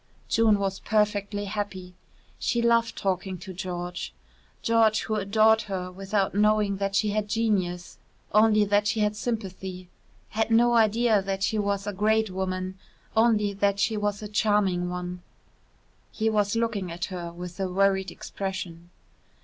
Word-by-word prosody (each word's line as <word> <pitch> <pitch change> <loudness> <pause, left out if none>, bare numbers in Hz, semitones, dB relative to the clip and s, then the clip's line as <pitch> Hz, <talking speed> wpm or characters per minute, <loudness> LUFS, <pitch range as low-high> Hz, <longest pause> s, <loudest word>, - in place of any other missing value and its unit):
June 220 -2 +4
was 195 -1 -2
perfectly 205 -1 0
happy. 195 -3 -5 0.5
She 235 - 0
loved 235 -1 +2
talking 190 -1 -2
to 185 +2 -9
George 180 -1 -5 0.5
George 225 -1 +3
who 220 - -3
adored 215 +2 +3
her 185 -1 -3
without 195 +1 -1
knowing 210 -1 +2
that 195 0 -2
she 210 +1 +2
had 210 0 -1
genius, 190 -6 -1 0.3
only 215 0 +5
that 205 +1 +2
she 215 - 0
had 210 0 +1
sympathy 190 -5 -5 0.4
had 220 +1 -1
no 240 +1 +4
idea 225 -1 +3
that 195 0 -3
she 215 +1 +1
was 200 -1 -1
a 205 - -3
great 215 +1 +1
woman, 185 0 -3 0.4
only 220 -3 +3
that 200 0 +1
she 220 +2 +1
was 205 0 -2
a - - -4
charming 205 -4 +1
one. 180 0 -5 0.9
He 220 0 0
was 210 0 +1
looking 225 -6 -1
at 175 +2 -3
her 170 -2 -5
with 175 +1 -8
a 190 -1 -1
worried 195 0 +2
expression. 175 -3 -6
200 Hz, 150 wpm, -26 LUFS, 185-215 Hz, 0.9 s, only